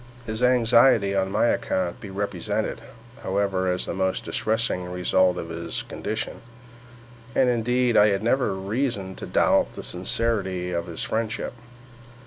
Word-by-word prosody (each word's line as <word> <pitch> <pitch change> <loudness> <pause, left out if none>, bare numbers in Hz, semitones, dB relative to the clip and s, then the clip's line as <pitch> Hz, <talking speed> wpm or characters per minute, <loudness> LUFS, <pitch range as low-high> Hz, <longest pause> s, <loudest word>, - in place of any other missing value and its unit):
His 110 0 -4
anxiety 115 -4 +4
on 95 0 0
my 105 - +2
account 95 -6 0
he 105 - -8
represented, 100 +1 -2 0.4
however, 95 -1 0
as 90 - -2
the - - -4
most 95 -1 -1
distressing 110 -4 0
result 90 0 +2
of 85 - -5
his 85 0 -3
condition; - - -5 0.9
and, 130 - +4
indeed, 125 +1 +1
I 105 - +7
had 100 0 0
never 125 -2 +1
reason 100 0 -2
to - - -7
doubt - - +3
the - - -8
sincerity 95 -1 -1
of 85 0 -2
his 85 -2 -5
friendship. 115 +1 -2
100 Hz, 140 wpm, -25 LUFS, 95-115 Hz, 0.9 s, I